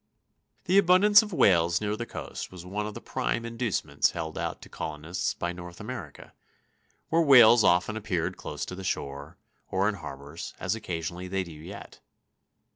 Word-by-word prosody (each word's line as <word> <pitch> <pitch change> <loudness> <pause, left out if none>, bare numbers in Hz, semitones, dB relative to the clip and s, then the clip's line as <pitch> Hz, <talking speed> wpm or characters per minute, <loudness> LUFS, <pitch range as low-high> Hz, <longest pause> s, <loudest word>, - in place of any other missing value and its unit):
] - - -44
The 190 +3 +5
abundance 200 +3 +6
of 215 -1 -7
whales 85 - +4
near 105 0 -1
the 120 +2 -5
coast - - -7
was 90 -1 -10
one 105 +3 -3
of 105 - -7
the - - -7
prime 115 - -2
inducements 115 - 0
held 80 -1 -4
out - - -3
to - - -11
colonists 80 +2 -4
by 85 0 -3
North 90 -1 -10
America, 105 - -8 0.8
where 165 +1 +3
whales 120 -6 +8
often 90 +5 +3
appeared 95 -6 -2
close - - -5
to - - -7
the 95 +1 -7
shore, 70 -2 -4 0.3
or 95 +1 +1
in 105 - +1
harbors, 75 -3 -8
as 95 - -1
occasionally 90 -4 -4
they 95 +1 -1
do 85 - -11
yet. 85 +6 -10
95 Hz, 175 wpm, -28 LUFS, 85-115 Hz, 0.8 s, whales